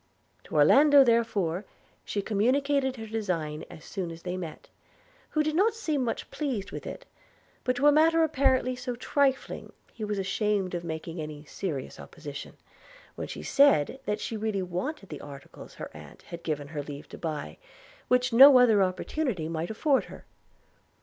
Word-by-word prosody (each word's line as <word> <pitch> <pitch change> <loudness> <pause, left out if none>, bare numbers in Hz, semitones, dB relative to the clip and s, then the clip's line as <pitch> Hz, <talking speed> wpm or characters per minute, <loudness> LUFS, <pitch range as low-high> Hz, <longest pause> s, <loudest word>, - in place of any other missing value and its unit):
To - - -8
Orlando, 280 - +7
therefore, 215 -7 +1 0.4
she 200 - -3
communicated 265 +6 +1
her 225 -3 -7
design 180 -9 -3
as 165 -3 -12
soon 185 -4 -4
as 165 0 -10
they 180 0 -3
met, 175 -4 -7 0.6
who 310 - +1
did 310 0 -1
not 430 +6 +3
seem 310 - -1
much 235 - -4
pleased 230 -10 -3
with - - -7
it; - - -7 0.6
but 250 0 +1
to 265 +4 0
a 295 - +8
matter 325 +2 +4
apparently 265 -4 +2
so 250 0 -4
trifling 270 +2 0 0.2
he 220 - -7
was 210 -1 -2
ashamed 195 -1 0
of 175 -1 -3
making 165 0 -5
any 150 -1 -7
serious 150 -4 -5
opposition, 145 -4 -9 0.6
when - - -6
she - - -7
said 270 - +4
that 210 -2 -1
she 225 - -4
really 215 -3 -1
wanted 195 - -4
the 150 - -7
articles 140 -1 -11
her - - -8
aunt - - -13
had 170 -1 -9
given 145 -3 -3
her 150 -1 -4
leave 145 0 -8
to - - -10
buy, 150 - -5 0.5
which 250 0 +2
no 270 +3 +10
other 225 -5 +5
opportunity 185 - -1
might 165 +1 -3
afford 270 +5 +1
her. - - -12
210 Hz, 170 wpm, -28 LUFS, 165-265 Hz, 0.6 s, no